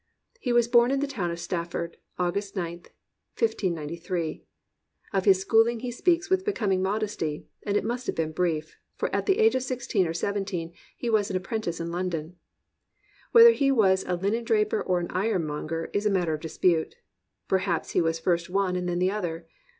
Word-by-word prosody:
He 250 Hz, -, -2 dB
was 240 Hz, -1 st, +4 dB
born 240 Hz, 0 st, +5 dB
in 275 Hz, 0 st, +1 dB
the 285 Hz, -, +1 dB
town 230 Hz, -11 st, -3 dB
of 170 Hz, 0 st, -4 dB
Stafford, 170 Hz, -1 st, -3 dB, 0.2 s
August 195 Hz, +3 st, -2 dB
9th, 175 Hz, -2 st, -4 dB, 0.5 s
1593. 170 Hz, -5 st, -2 dB, 0.7 s
Of 195 Hz, -1 st, +1 dB
his 190 Hz, -1 st, +4 dB
schooUng 225 Hz, +2 st, +4 dB
he 250 Hz, -1 st, -3 dB
speaks 345 Hz, +8 st, +1 dB
with 375 Hz, 0 st, +2 dB
becoming 210 Hz, -, 0 dB
modesty; 195 Hz, -6 st, -2 dB, 0.2 s
and 205 Hz, 0 st, 0 dB
it -, -, 0 dB
must 245 Hz, +2 st, -3 dB
have -, -, -1 dB
been 160 Hz, -1 st, -1 dB
brief, 160 Hz, -2 st, -2 dB, 0.2 s
for -, -, -3 dB
at -, -, -1 dB
the 390 Hz, 0 st, +3 dB
age 445 Hz, 0 st, +5 dB
of 260 Hz, -, 0 dB
sixteen 245 Hz, -7 st, 0 dB
or 165 Hz, -, -2 dB
seventeen 190 Hz, -3 st, -2 dB, 0.2 s
he 240 Hz, -, -4 dB
was 215 Hz, -3 st, +2 dB
an 185 Hz, -, 0 dB
apprentice 190 Hz, -3 st, -3 dB
in 170 Hz, 0 st, -4 dB
London. 175 Hz, -2 st, -3 dB, 1.0 s
Whether 465 Hz, 0 st, +10 dB
he 280 Hz, -11 st, +2 dB
was 190 Hz, -7 st, +4 dB
a 180 Hz, -, 0 dB
linendraj>er 215 Hz, +2 st, +1 dB
or 180 Hz, -1 st, +1 dB
an 175 Hz, -, -3 dB
iron 190 Hz, -2 st, 0 dB
monger 155 Hz, +2 st, -4 dB
is 205 Hz, +1 st, +1 dB
a -, -, +3 dB
matter 180 Hz, -5 st, +1 dB
of 155 Hz, -, -4 dB
dispute. 160 Hz, -, +1 dB, 0.5 s
Perhaps 190 Hz, -3 st, 0 dB
he -, -, +2 dB
was 165 Hz, 0 st, +1 dB
first 170 Hz, +1 st, 0 dB
one 190 Hz, -1 st, +1 dB
and 180 Hz, 0 st, -2 dB
then 175 Hz, -, -1 dB
the 185 Hz, +1 st, +2 dB
other. 175 Hz, -5 st, -4 dB
190 Hz, 190 wpm, -27 LUFS, 170-225 Hz, 1.0 s, Whether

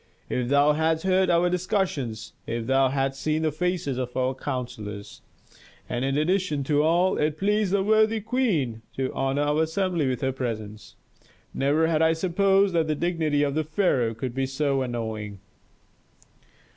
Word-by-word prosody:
If 125 Hz, -1 st, -1 dB
thou 145 Hz, +2 st, +4 dB
hadst 160 Hz, +1 st, 0 dB
heard 185 Hz, 0 st, +2 dB
our 170 Hz, 0 st, +3 dB
discussions, 175 Hz, -, -2 dB
if 115 Hz, 0 st, -3 dB
thou 135 Hz, +1 st, +3 dB
hadst 135 Hz, 0 st, -2 dB
seen 155 Hz, +1 st, 0 dB
the 155 Hz, -, +1 dB
faces 160 Hz, -5 st, -2 dB
of 125 Hz, -1 st, -4 dB
our 130 Hz, 0 st, +1 dB
counsellors! 110 Hz, -7 st, -6 dB, 0.7 s
And 120 Hz, +1 st, -2 dB
in 135 Hz, +1 st, 0 dB
addition 155 Hz, -2 st, 0 dB
to 145 Hz, +1 st, +2 dB
all, 170 Hz, +4 st, +2 dB
it 150 Hz, 0 st, 0 dB
pleased 205 Hz, +1 st, +1 dB
the 200 Hz, -1 st, +2 dB
worthy 220 Hz, +1 st, +3 dB
queen 205 Hz, -, -1 dB
to 130 Hz, -1 st, -2 dB
honor 135 Hz, +2 st, 0 dB
our 150 Hz, +2 st, +1 dB
assembly 165 Hz, -1 st, 0 dB
with 125 Hz, -2 st, -3 dB
her 135 Hz, -, 0 dB
presence. 110 Hz, -5 st, -6 dB, 0.6 s
Never 145 Hz, +4 st, +2 dB
had 160 Hz, -1 st, +1 dB
I 160 Hz, 0 st, +4 dB
supposed 195 Hz, +3 st, +2 dB
that 165 Hz, -2 st, +1 dB
the 155 Hz, -, 0 dB
dignity 160 Hz, -3 st, 0 dB
of 145 Hz, +2 st, 0 dB
pharaoh 135 Hz, -, +1 dB
could 125 Hz, +1 st, -4 dB
be 135 Hz, +1 st, -1 dB
so 135 Hz, 0 st, 0 dB
annoying." 110 Hz, -4 st, -4 dB
150 Hz, 160 wpm, -25 LUFS, 130-175 Hz, 0.7 s, thou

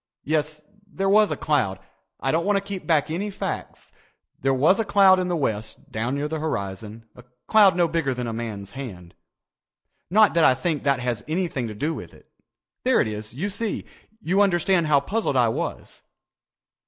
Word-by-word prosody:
Yes, 155 Hz, 0 st, -1 dB, 0.3 s
there 195 Hz, 0 st, -1 dB
was 210 Hz, +2 st, +5 dB
a -, -, -2 dB
cloud. 115 Hz, -11 st, 0 dB, 0.4 s
I 135 Hz, -, 0 dB
don't 165 Hz, +1 st, +1 dB
want 205 Hz, +1 st, +2 dB
to 195 Hz, -, -2 dB
keep 200 Hz, -2 st, -7 dB
back 155 Hz, -2 st, +2 dB
any 195 Hz, +6 st, -2 dB
facts. 195 Hz, -, -6 dB, 0.5 s
There 135 Hz, -, +1 dB
was 150 Hz, -, +3 dB
a -, -, +2 dB
cloud 195 Hz, -2 st, +5 dB
in 180 Hz, -, -1 dB
the 175 Hz, -, 0 dB
west 110 Hz, -8 st, -3 dB
down 120 Hz, +5 st, -2 dB
near 145 Hz, +1 st, -2 dB
the 160 Hz, +1 st, -4 dB
horizon, 110 Hz, -5 st, -4 dB
a 125 Hz, -, -14 dB, 0.2 s
cloud 205 Hz, -4 st, +6 dB
no 175 Hz, -1 st, +3 dB
bigger 165 Hz, -4 st, -1 dB
than 125 Hz, -1 st, -3 dB
a 115 Hz, -, -4 dB
man's 110 Hz, -4 st, -6 dB
hand. 95 Hz, -11 st, -8 dB, 1.0 s
"Not 215 Hz, +3 st, +5 dB
that 165 Hz, -1 st, +3 dB
I 130 Hz, -, +6 dB
think 155 Hz, +2 st, -2 dB
that 140 Hz, -2 st, +2 dB
has 120 Hz, -3 st, -2 dB
anything 160 Hz, -7 st, -2 dB
to 105 Hz, -, -7 dB
do 150 Hz, +9 st, -1 dB
with -, -, -9 dB
it. -, -, -20 dB, 0.6 s
There 255 Hz, 0 st, +3 dB
it -, -, +2 dB
is, 105 Hz, +1 st, -5 dB
you 180 Hz, +9 st, -2 dB
see. 205 Hz, +2 st, -2 dB, 0.3 s
You 195 Hz, 0 st, +1 dB
understand 175 Hz, -3 st, +2 dB
how 145 Hz, -2 st, +4 dB
puzzled 195 Hz, -4 st, -1 dB
I 120 Hz, -2 st, +4 dB
was. 110 Hz, -, -5 dB
155 Hz, 190 wpm, -24 LUFS, 120-190 Hz, 1.0 s, cloud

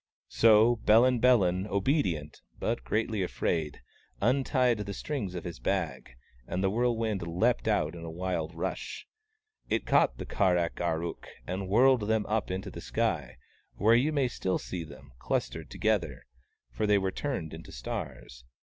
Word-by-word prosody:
So 115 Hz, +1 st, +5 dB
Bellin 120 Hz, +3 st, +4 dB
Bellin, 100 Hz, -6 st, +3 dB
obedi 100 Hz, -, +1 dB
ent, 75 Hz, 0 st, -12 dB, 0.2 s
but 115 Hz, +1 st, -2 dB
greatly 110 Hz, -1 st, -1 dB
afraid, 80 Hz, -4 st, -2 dB, 0.4 s
untied 125 Hz, 0 st, +2 dB
the 100 Hz, -1 st, -4 dB
strings 105 Hz, -11 st, -4 dB
of 90 Hz, -, -5 dB
his 85 Hz, -2 st, -7 dB
bag, 75 Hz, -11 st, -2 dB, 0.3 s
and 95 Hz, -, -2 dB
the 95 Hz, -, +2 dB
whirlwind 115 Hz, -3 st, 0 dB
leapt 110 Hz, +9 st, +1 dB
out 100 Hz, -8 st, +1 dB
with 85 Hz, -1 st, -9 dB
a 85 Hz, -, -6 dB
wild 85 Hz, -1 st, -3 dB
rush. 80 Hz, -, -4 dB, 0.6 s
It -, -, 0 dB
caught -, -, +3 dB
the -, -, -6 dB
Kar 95 Hz, -5 st, +2 dB
ak 85 Hz, 0 st, -2 dB
ar 85 Hz, -1 st, 0 dB
ook, 85 Hz, -, -6 dB, 0.2 s
and 95 Hz, +1 st, -4 dB
whirled 120 Hz, +1 st, +4 dB
them 110 Hz, -1 st, +1 dB
up 110 Hz, 0 st, -1 dB
into 95 Hz, +1 st, -4 dB
the -, -, -8 dB
sky, -, -, -1 dB, 0.4 s
where 110 Hz, +2 st, +4 dB
you 130 Hz, +6 st, +3 dB
may 140 Hz, -4 st, +2 dB
still 95 Hz, -6 st, -1 dB
see 90 Hz, -2 st, -5 dB
them, 70 Hz, -3 st, -13 dB
clustered -, -, -2 dB
together, -, -, -1 dB, 0.5 s
for 105 Hz, -, -1 dB
they 105 Hz, 0 st, +5 dB
were 95 Hz, -1 st, 0 dB
turned 125 Hz, -, -4 dB
into -, -, -10 dB
stars. 60 Hz, +1 st, -6 dB
100 Hz, 165 wpm, -29 LUFS, 85-115 Hz, 0.6 s, So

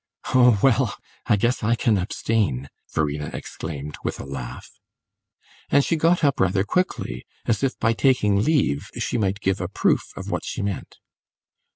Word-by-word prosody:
"Oh, 125 Hz, -4 st, +6 dB
well, 130 Hz, -5 st, +3 dB, 0.3 s
I -, -, +5 dB
guess 120 Hz, +5 st, +1 dB
I 115 Hz, +2 st, +2 dB
can 110 Hz, -3 st, +2 dB
abstain!" 90 Hz, -, -1 dB, 0.2 s
Verena 75 Hz, -1 st, -1 dB
exclaimed, 75 Hz, -2 st, -6 dB
with -, -, -3 dB
a -, -, -6 dB
laugh. 70 Hz, -3 st, -7 dB, 1.0 s
And 140 Hz, -, +4 dB
she 165 Hz, -, +1 dB
got 165 Hz, +2 st, +2 dB
up 140 Hz, -2 st, +3 dB
rather 95 Hz, +1 st, +2 dB
quickly, 180 Hz, -, -1 dB, 0.2 s
as 115 Hz, -, +1 dB
if 135 Hz, -1 st, 0 dB
by 115 Hz, -, +2 dB
taking 105 Hz, -6 st, +3 dB
leave 125 Hz, -, +1 dB
she 120 Hz, -, -1 dB
might 100 Hz, 0 st, 0 dB
give 95 Hz, -1 st, 0 dB
a 90 Hz, -, -1 dB
proof 95 Hz, -, +2 dB, 0.2 s
of -, -, -5 dB
what -, -, -2 dB
she -, -, -4 dB
meant. 100 Hz, -2 st, -4 dB
105 Hz, 165 wpm, -23 LUFS, 85-125 Hz, 1.0 s, Oh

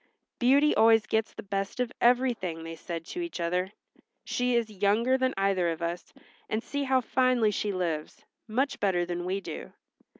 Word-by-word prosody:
"Beauty 280 Hz, +4 st, +4 dB
always 225 Hz, -1 st, +5 dB
gets 220 Hz, 0 st, 0 dB
the 225 Hz, -, -9 dB
best 195 Hz, +2 st, -3 dB
of 250 Hz, -1 st, 0 dB
everything," 235 Hz, -9 st, +2 dB
they 165 Hz, 0 st, -6 dB
said 165 Hz, 0 st, -6 dB
to 355 Hz, -, -5 dB
each 340 Hz, -, -5 dB
other. 180 Hz, +3 st, -1 dB, 0.5 s
"She 245 Hz, 0 st, 0 dB
is 235 Hz, -2 st, +2 dB
younger 210 Hz, +6 st, +2 dB
than 260 Hz, 0 st, 0 dB
either 195 Hz, -3 st, +2 dB
of 165 Hz, 0 st, -4 dB
us, 170 Hz, +1 st, -4 dB, 0.4 s
and 220 Hz, +2 st, -1 dB
see 285 Hz, -1 st, -3 dB
how 260 Hz, -1 st, +3 dB
finely 250 Hz, -2 st, +2 dB
she 205 Hz, +1 st, -1 dB
lives; 170 Hz, -5 st, -3 dB, 0.2 s
much 260 Hz, +6 st, -1 dB
better 180 Hz, -3 st, +1 dB
than 175 Hz, 0 st, -4 dB
we 190 Hz, +2 st, -1 dB
do." -, -, -7 dB
210 Hz, 175 wpm, -28 LUFS, 180-250 Hz, 0.5 s, always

